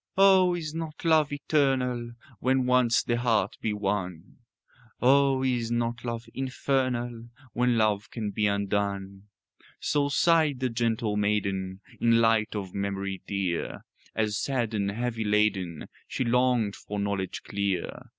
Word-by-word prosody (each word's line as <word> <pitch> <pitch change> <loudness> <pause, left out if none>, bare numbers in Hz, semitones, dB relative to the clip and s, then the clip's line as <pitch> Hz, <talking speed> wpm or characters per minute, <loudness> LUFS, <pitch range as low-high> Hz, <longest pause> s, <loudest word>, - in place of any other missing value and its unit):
"Oh, 190 -2 +6
is 155 -3 -5
not 160 0 -6
love 155 -3 +4
eternal 130 -5 0 0.3
When 130 +1 +2
once 125 -2 +3
the 120 - 0
heart 110 -5 0
be 110 - 0
won? 95 -4 -3 0.6
Oh, 135 +1 +4
is 120 -3 0
not 120 0 -1
love 115 -1 -4
infernal 125 -3 -1 0.3
When 125 -1 +2
love 105 -2 +1
can 110 -3 -4
be 105 +1 +1
undone?" 100 -1 -2 0.5
So 145 -1 +1
sighed 155 -4 +3
a 130 - +2
gentle 115 -2 0
maiden 100 -2 -1 0.2
In 115 -1 +4
light 115 -1 +2
of 95 -3 -5
memory 100 -1 -3
dear, 95 -4 -2 0.3
As, 110 -1 0
sad 120 -5 -1
and 100 -2 0
heavy 115 +2 -2
laden, 105 -6 0 0.2
She - - -2
longed 125 -3 +2
for 105 - -7
knowledge 100 -2 -2
clear. 100 -3 -3
115 Hz, 135 wpm, -27 LUFS, 100-130 Hz, 0.6 s, Oh